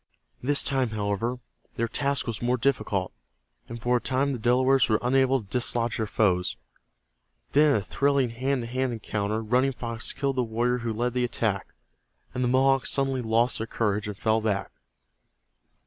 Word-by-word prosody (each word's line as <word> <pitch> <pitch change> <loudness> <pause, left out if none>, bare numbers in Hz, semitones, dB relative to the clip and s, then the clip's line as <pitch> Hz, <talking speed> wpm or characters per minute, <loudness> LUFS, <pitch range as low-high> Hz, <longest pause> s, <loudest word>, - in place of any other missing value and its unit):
This 140 +3 +2
time, 135 -3 0
however, 110 +3 -2 0.4
their 115 - 0
task 140 +3 0
was 115 -3 -4
more 125 +1 +1
difficult, 115 -7 0 0.6
and 115 0 -6
for 125 +2 +2
a - - -4
time 135 +4 0
the 125 - -4
Delawares 130 +3 +3
were 110 - +4
unable 130 +1 +2
to 110 - -11
dislodge 120 +1 -1
their 110 - -1
foes. 95 -4 +1 1.0
Then 150 +1 +5
in 140 - +3
a 105 - +1
thrilling 140 +3 +1
hand 130 +2 -1
to - - -6
hand 130 +1 -1
encounter 110 0 -2
Running 125 +5 +2
Fox 115 -2 -1
killed 140 -2 -2
the 125 - +2
warrior 120 +2 0
who 115 -1 -3
led 120 +2 -1
the 125 0 0
attack, 110 -5 -1 0.7
and 125 - -1
the - - +2
Mohawks 135 +1 +3
suddenly 135 -2 +1
lost 115 +1 +1
their 115 - -3
courage, 105 -1 -1
and 105 -2 -6
fell 110 +1 +1
back. 100 -3 -1
120 Hz, 180 wpm, -26 LUFS, 110-130 Hz, 1.0 s, Then